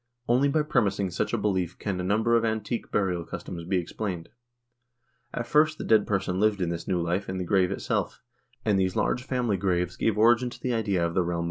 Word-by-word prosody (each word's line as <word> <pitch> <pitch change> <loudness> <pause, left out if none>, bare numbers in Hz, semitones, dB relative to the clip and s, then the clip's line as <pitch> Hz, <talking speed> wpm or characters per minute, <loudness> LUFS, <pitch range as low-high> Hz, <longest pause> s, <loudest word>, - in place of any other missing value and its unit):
Only 125 +4 +3
by 150 +2 +2
premising 100 -10 +1
such 85 - -1
a - - +1
belief 95 -4 -1
can 95 -3 -3
a - - -4
number 110 +5 +2
of 115 - +3
antique 110 +1 -2
burial 90 -4 0
customs 85 0 -7
be 95 +2 0
explained.... 90 0 -4 1.0
At 120 - -3
first 150 +4 +3
the - - -5
dead 110 -2 +3
person 95 -2 -1
lived 105 0 +3
this 85 -3 -3
new 90 -2 +1
life 90 +4 -1
in 95 - -3
the 90 - -2
grave 95 0 +3
itself, 100 - -2 0.5
and 105 -3 +3
these 95 -1 0
large 125 - +1
family 125 -5 -1
graves 90 -1 0
gave 110 -2 0
origin 120 +3 +4
to 120 - -11
the 125 - -1
idea 100 -6 +1
of 85 - -2
the 95 - +2
realm 85 - -2
of - - -1
the - - -1
dead." - - -2
100 Hz, 230 wpm, -27 LUFS, 90-115 Hz, 1.0 s, origin